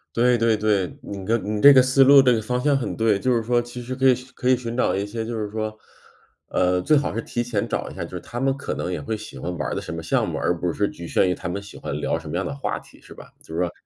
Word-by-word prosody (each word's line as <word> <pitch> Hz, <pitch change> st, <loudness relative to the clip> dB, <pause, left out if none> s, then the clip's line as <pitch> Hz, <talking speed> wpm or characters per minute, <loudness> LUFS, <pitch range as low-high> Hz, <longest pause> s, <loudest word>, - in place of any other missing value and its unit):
对 125 Hz, +1 st, +4 dB
对 115 Hz, -1 st, +3 dB
对， 105 Hz, -4 st, 0 dB
你 100 Hz, -1 st, -7 dB
跟 115 Hz, +3 st, 0 dB
你 -, -, -3 dB
这 145 Hz, -, +10 dB
个 130 Hz, -2 st, +7 dB
思 130 Hz, +1 st, +5 dB
路、 140 Hz, +1 st, +8 dB
这 125 Hz, -2 st, +4 dB
个 110 Hz, -, 0 dB
方 125 Hz, +3 st, -2 dB
向， 145 Hz, +2 st, +2 dB
很 135 Hz, -3 st, -2 dB
对。 110 Hz, -3 st, +2 dB
就 125 Hz, +3 st, +1 dB
是 115 Hz, -, 0 dB
说 120 Hz, +1 st, +2 dB
其 120 Hz, +1 st, -9 dB
实 125 Hz, +2 st, -5 dB
可 135 Hz, +1 st, +3 dB
以 130 Hz, -, +5 dB, 0.2 s
可 125 Hz, -, -1 dB
以 130 Hz, -, +5 dB
寻 120 Hz, -1 st, -5 dB
找 125 Hz, -, +1 dB
一 100 Hz, +1 st, -1 dB
些 110 Hz, +2 st, -4 dB
就 115 Hz, +1 st, -4 dB
是 105 Hz, -1 st, -4 dB
说， 110 Hz, 0 st, -4 dB, 0.7 s
呃， 90 Hz, 0 st, +1 dB
最 150 Hz, +10 st, +4 dB
好 145 Hz, -, -1 dB
是 115 Hz, -, -2 dB
提 120 Hz, +1 st, -3 dB
前 115 Hz, -4 st, -2 dB
找 -, -, -2 dB
一 -, -, -12 dB
下， -, -, -4 dB
就 -, -, -9 dB
是 -, -, -5 dB
他 120 Hz, -, -7 dB
们 135 Hz, +1 st, +1 dB
可 140 Hz, -, -4 dB
能 90 Hz, -, -3 dB
也 90 Hz, -, -3 dB
会 110 Hz, -, -3 dB
喜 105 Hz, 0 st, -9 dB
欢 90 Hz, -, -4 dB
玩 75 Hz, -, -2 dB
儿 -, -, -3 dB
的 -, -, -3 dB
什 -, -, -7 dB
么 -, -, -5 dB
项 -, -, 0 dB
目， -, -, -3 dB
而 85 Hz, -, 0 dB
不 85 Hz, -1 st, -1 dB
是 100 Hz, 0 st, 0 dB
局 85 Hz, 0 st, -9 dB
限 95 Hz, -, +2 dB
于 90 Hz, -, 0 dB
他 90 Hz, -, -6 dB
们 100 Hz, +3 st, -3 dB
喜 100 Hz, -, -12 dB
欢 -, -, -5 dB
聊 -, -, 0 dB
什 -, -, -10 dB
么 75 Hz, -, -4 dB
样 95 Hz, -, 0 dB
的 140 Hz, -, -4 dB
话 140 Hz, -, -3 dB
题， -, -, -19 dB
是 -, -, -13 dB
吧？ -, -, -14 dB
就 -, -, -11 dB
是 80 Hz, -, -2 dB
说 90 Hz, -, 0 dB
115 Hz, 345 characters per minute, -23 LUFS, 100-125 Hz, 0.7 s, 这